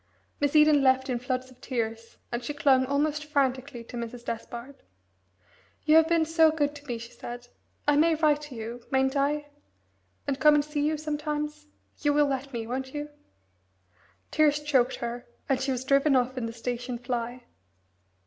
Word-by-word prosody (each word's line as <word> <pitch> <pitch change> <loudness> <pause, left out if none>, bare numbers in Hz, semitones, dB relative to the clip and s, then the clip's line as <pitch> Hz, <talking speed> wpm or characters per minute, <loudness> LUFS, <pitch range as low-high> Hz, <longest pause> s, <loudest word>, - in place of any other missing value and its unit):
Miss 285 +1 0
Eden 300 -1 +6
left 260 0 +3
in 245 - -1
floods 255 +1 -3
of 250 - -20
tears, 230 -2 -4
and 240 0 -3
she 290 +4 -4
clung 265 -3 +4
almost 295 +2 0
frantically 270 -4 -1
to 235 - -11
Mrs. 235 0 -6
Despard. 235 +4 -6 1.1
"You 310 0 +5
have 320 0 +6
been 330 -1 +3
so 325 0 +5
good 295 -2 0
to 290 0 -12
me," 240 -2 -2
she 235 +1 -9
said. 245 0 -8 0.4
"I 290 - +5
may 325 +2 +4
write 300 -1 +3
to 260 - -9
you, 230 +2 -6
mayn't 265 +1 +2
I? 290 +1 0 0.8
and 280 -1 -2
come 300 +2 +6
and 290 -1 +2
see 300 -1 -2
you 305 +1 +1
sometimes? 300 0 -3 0.3
You 290 -1 +2
will 295 0 +4
let 275 0 -3
me, 230 -3 -4
won't 260 +3 -4
you?" 295 0 -4 1.2
Tears 295 -1 +3
choked 265 -4 +2
her, 240 +1 -5 0.2
and 265 -2 +1
she 270 - 0
was 255 0 -3
driven 275 +1 +4
off 255 0 +1
in 245 -3 -2
the - - -5
station 245 +1 -4
fly. 245 0 -4
270 Hz, 180 wpm, -27 LUFS, 245-295 Hz, 1.2 s, Eden